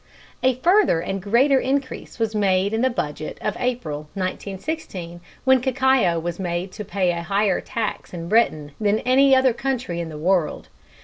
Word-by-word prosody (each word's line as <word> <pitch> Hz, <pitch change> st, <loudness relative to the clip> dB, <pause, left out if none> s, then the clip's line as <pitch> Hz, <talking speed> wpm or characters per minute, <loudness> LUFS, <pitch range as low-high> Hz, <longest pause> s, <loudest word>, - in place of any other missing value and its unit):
A 260 Hz, -1 st, +3 dB
further 360 Hz, -, +4 dB
and 195 Hz, +3 st, -3 dB
greater 255 Hz, +8 st, +3 dB
increase 265 Hz, 0 st, -3 dB
was 225 Hz, -2 st, -1 dB
made 200 Hz, -1 st, +1 dB
in 225 Hz, -, 0 dB
the 260 Hz, -, +3 dB
Budget 155 Hz, -9 st, -4 dB
of 210 Hz, -, -2 dB
April, 155 Hz, -12 st, -3 dB
1916, 190 Hz, -, -5 dB, 0.2 s
when 260 Hz, -1 st, +4 dB
cacao 260 Hz, -8 st, +2 dB
was 170 Hz, +2 st, -4 dB
made 175 Hz, 0 st, -3 dB
to 210 Hz, -, -7 dB
pay 190 Hz, -3 st, 0 dB
a 170 Hz, -1 st, -3 dB
higher 195 Hz, +2 st, +1 dB
tax 225 Hz, -2 st, -4 dB
in 170 Hz, -1 st, -6 dB
Britain 165 Hz, -8 st, +2 dB
than 210 Hz, -1 st, +2 dB
in 240 Hz, -, -7 dB
any 270 Hz, +1 st, +5 dB
other 260 Hz, -2 st, +4 dB
country 245 Hz, -8 st, -3 dB
in 170 Hz, -1 st, -4 dB
the 155 Hz, -, -8 dB
world. 175 Hz, +1 st, 0 dB
200 Hz, 175 wpm, -22 LUFS, 175-255 Hz, 0.2 s, any